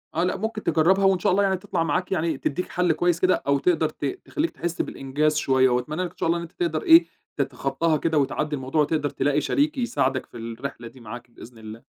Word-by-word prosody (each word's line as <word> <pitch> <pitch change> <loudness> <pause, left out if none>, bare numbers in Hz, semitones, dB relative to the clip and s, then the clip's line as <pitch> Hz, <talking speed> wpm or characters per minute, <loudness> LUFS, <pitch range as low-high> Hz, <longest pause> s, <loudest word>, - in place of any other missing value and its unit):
آه، 170 - +1
لأ 180 - 0
ممكن 220 +1 -4
تجربها، 175 +5 +3
وإن 190 -2 +4
شاء - - +2
الله 200 +2 +3
يعني 190 -1 +1
تطلَع 185 -3 -2
معاك 180 +4 -1
يعني 160 -5 0
تدّيك 165 +7 -3
حَلّ 180 -1 +1
كويس 175 +1 +1
كده، 185 0 +2
أو 140 0 +3
تقدَر 160 -2 +2
ت 150 - -6
تخلّيك 305 - -2
تحس 170 -1 -3
بالإنجاز 150 +3 -1
شوية، 130 -3 +3
وأتمنى 150 +8 -1
لك 180 - -4
إن - - -28
شاء - - -1
الله 170 +1 +2
إن - - -4
أنت 170 - -10
تقدَر 165 -3 -2
إيه 165 +1 +7 0.3
تتخطاها 140 +4 0
كده، 160 +1 0
وتعدّي 145 +2 0
الموضوع، 135 +3 -1
وتقدَر 150 -1 0
تلاقي 145 +3 0
شريك 295 - 0
يساعدك 135 - 0
في 120 - -13
الرحلة 115 +1 -7
دي 130 - -14
معاك 120 +2 -10
بإذن 115 0 -13
الله. 110 +1 -10
155 Hz, 225 wpm, -24 LUFS, 135-180 Hz, 0.3 s, إيه